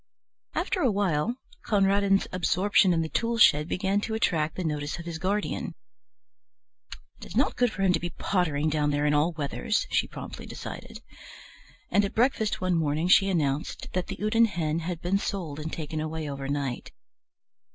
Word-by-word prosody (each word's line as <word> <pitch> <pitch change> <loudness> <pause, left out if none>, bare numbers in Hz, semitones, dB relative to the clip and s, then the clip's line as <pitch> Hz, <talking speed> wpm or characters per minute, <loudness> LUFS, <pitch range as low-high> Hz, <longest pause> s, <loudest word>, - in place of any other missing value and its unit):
After 370 - 0
a 260 - +4
while 200 +1 0 0.3
Conradin's 200 -1 +3
absorption 185 +2 +3
in 165 -1 +2
the - - -3
tool 230 +5 0
shed 150 -8 +6
began 195 +3 0
to 220 +1 -3
attract 160 -8 0
the 185 - -3
notice 150 -2 -2
of 170 - -8
his 165 -2 -5
guardian. 190 -2 -2 1.4
"It - - -10
is - - -6
not 270 - +2
good 245 -2 +2
for 195 - -3
him 185 -2 +4
to - - +1
be 175 - -3
pottering 160 -6 0
down 150 -1 +1
there 145 0 0
in 150 - +3
all 150 +4 +3
weathers," 160 +9 -1
she - - +2
promptly - - -8
decided, - - -8 0.9
and 205 - +4
at 200 - -3
breakfast 225 -3 +1
one 185 -1 0
morning 155 +2 0
she 195 +1 +6
announced 150 -5 -1
that 180 -1 -1
the - - -4
Houdan 220 +2 +3
hen 165 -6 -1
had 170 0 -4
been 190 +3 +1
sold 170 -9 -4
and 155 +1 -5
taken 155 -1 -4
away 155 0 -4
overnight. 140 -2 -3
175 Hz, 175 wpm, -27 LUFS, 150-200 Hz, 1.4 s, shed